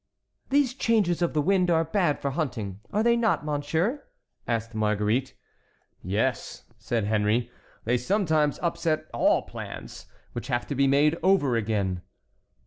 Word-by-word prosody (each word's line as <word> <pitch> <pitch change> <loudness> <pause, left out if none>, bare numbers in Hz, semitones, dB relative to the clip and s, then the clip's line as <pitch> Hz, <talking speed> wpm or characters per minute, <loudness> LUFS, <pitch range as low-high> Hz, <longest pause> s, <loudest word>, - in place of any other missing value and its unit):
"These 275 -2 +3
changes 215 -9 +1
of 170 - +1
the 150 -2 +1
wind 185 0 +2
are 165 -1 +3
bad 165 -3 +1
for 140 - -2
hunting, 120 - -3
are 210 +2 +1
they 235 0 +4
not, 225 -9 +1
monsieur?" 160 - -1 0.4
asked 115 -1 -2
Marguerite. 110 +4 0 0.7
"Yes," 105 +8 -2 0.2
said 115 -3 -1
Henry; 110 +3 +1 0.3
"they 120 +2 +1
sometimes 155 - +1
upset 170 -2 0
all - - +3
plans, - - -9 0.3
which 120 +1 -5
have 120 -3 -1
to - - -1
be 140 0 +2
made 150 +4 +3
over 180 -10 +3
again." 100 -5 -1
145 Hz, 140 wpm, -26 LUFS, 115-175 Hz, 0.7 s, they